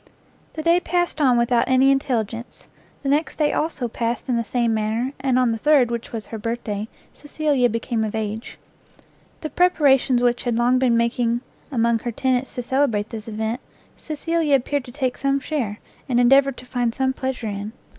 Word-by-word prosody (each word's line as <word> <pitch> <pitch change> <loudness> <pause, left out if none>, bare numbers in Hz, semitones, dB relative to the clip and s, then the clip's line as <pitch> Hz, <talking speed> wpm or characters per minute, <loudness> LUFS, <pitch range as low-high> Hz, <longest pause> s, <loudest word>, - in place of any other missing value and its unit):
The 315 - -5
day 340 +2 +4
passed 350 -2 -1
on 255 -4 +4
without 235 0 +2
any 260 +1 +5
intelligence; 240 -4 -2 0.4
the 275 - -1
next 295 +3 +1
day, 300 -2 +1
also, 300 -6 -1
passed 230 +1 -3
in 250 - +1
the 230 - 0
same 235 0 0
manner, 220 +5 -1
and 265 -1 +1
on 250 -2 +3
the 225 - -3
third, 275 -3 +4
which 235 -1 -4
was 225 -2 -5
her 225 - -7
birthday, 220 -2 -3 0.3
Cecilia 290 -4 0
became 230 0 -2
of 215 0 -3
age. 220 +1 -4 0.8
The 310 - -5
preparations 275 -8 +3
which 240 0 +2
had 240 -2 -1
long 245 +2 +3
been 245 -3 +3
making 235 0 +1 0.3
among 235 -2 +2
her 240 - -4
tenants 260 +2 -1
to 245 - -3
celebrate 235 -5 0
this 225 -1 -7
event, 220 +3 -3 0.3
Cecilia 315 -1 0
appeared 275 +1 -1
to 245 - -10
take 255 -1 -2
some 275 0 +1
share, 255 -7 -3 0.3
and 245 -1 +2
endeavoured 270 +2 +4
to 250 - -11
find 245 -2 -1
some 265 -1 +1
pleasure 260 -2 -4
in. 205 +1 -5
245 Hz, 185 wpm, -22 LUFS, 230-275 Hz, 0.8 s, any